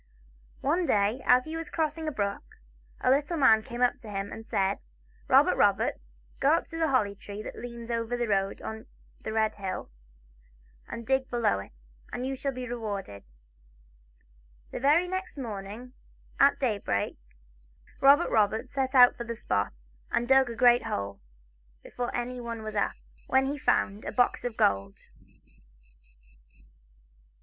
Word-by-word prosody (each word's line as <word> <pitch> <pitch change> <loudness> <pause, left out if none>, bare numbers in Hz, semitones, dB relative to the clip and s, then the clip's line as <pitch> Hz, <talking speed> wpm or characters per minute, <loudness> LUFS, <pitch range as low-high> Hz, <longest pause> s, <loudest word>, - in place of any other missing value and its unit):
One 335 +5 +1
day, 210 +5 +2
as 250 0 +5
he 315 +1 -6
was 325 -1 -5
crossing 315 0 -2
a - - 0
brook, 200 -6 -2 0.6
a - - +3
little 290 +5 +1
man 225 -7 +6
came 240 +3 -3
up 245 - +2
to 220 - -11
him 200 0 -4
and 225 - -9
said: 195 0 0 0.2
" - - -31
Robert - - +6
Roberts, - - +1 0.3
go - - +4
up - - +1
to 325 - -6
the 325 - +2
holly 235 -8 +2
tree 205 +1 -8
ihat - - -7
leans 235 -1 -7
over 230 +1 -1
the 240 -1 -1
road 195 -1 0
on 220 0 -7 0.3
the 220 - -5
Red 220 0 +1
hill, 190 - -5 1.0
and 235 - -7
dig 265 +1 +1
below 235 - +1
it, - - -12 0.3
and 250 - -3
you 270 +1 -2
shall 275 +1 -2
be 255 -1 -6
rewarded." 205 - -5 1.4
The - - -4
very 300 +7 +4
next 375 -2 -4
morning, 225 0 -7 0.5
at 280 - +5
daybreak, 210 - -1 0.8
Robert 285 +5 +5
Roberts 215 0 +1
set 270 -1 -1
out 250 -1 +8
for 235 - -5
the 235 0 -5
spot, 100 - -2 0.2
and 240 - 0
dug 265 -1 +5
a 230 - -5
great 245 0 +5
hole, 100 0 -3 0.6
before 245 -1 -4
anyone 240 -2 -4
was 215 0 -6
up, 205 - 0 0.3
when 265 0 +3
he 280 +2 -1
found 205 -7 0
a - - -3
box 245 -1 +1
of 245 -2 -4
gold. 100 0 +1
235 Hz, 160 wpm, -28 LUFS, 205-265 Hz, 1.4 s, out